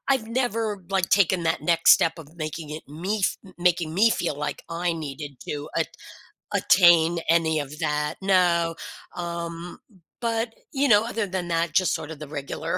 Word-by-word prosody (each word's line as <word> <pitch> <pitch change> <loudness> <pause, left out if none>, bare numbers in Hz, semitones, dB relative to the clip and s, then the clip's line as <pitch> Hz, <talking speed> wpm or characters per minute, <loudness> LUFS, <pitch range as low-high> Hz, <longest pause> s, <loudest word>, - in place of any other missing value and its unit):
I've 220 -4 -5
never, 225 -5 -1
like, 190 -3 0
taken 185 -3 +3
that 165 +1 0
next 170 -1 +5
step 165 +1 +3
of 155 +1 -13
making 155 0 -5
it 155 - -6
me 185 +9 -3
f - - +1 0.2
making 175 -2 +1
me 220 +5 +5
feel 170 -5 -1
like 150 0 -4
I 170 +1 -1
needed 145 -3 -7
to 145 0 -4
at - - +1 0.7
attain 170 -2 +5
any 160 -2 +3
of 145 +2 -6
that. 150 -2 -1
No, 175 -3 +2 0.4
um, 170 +2 -5 0.4
but, 230 0 -1 0.2
you 280 +1 +2
know, 210 -2 +6
other 230 -2 -2
than 185 -2 -3
that, 165 0 0
just 185 -1 +3
sort 160 -1 -6
of 155 - -9
the 150 - -7
regular 140 -1 -4
170 Hz, 175 wpm, -25 LUFS, 160-190 Hz, 0.7 s, know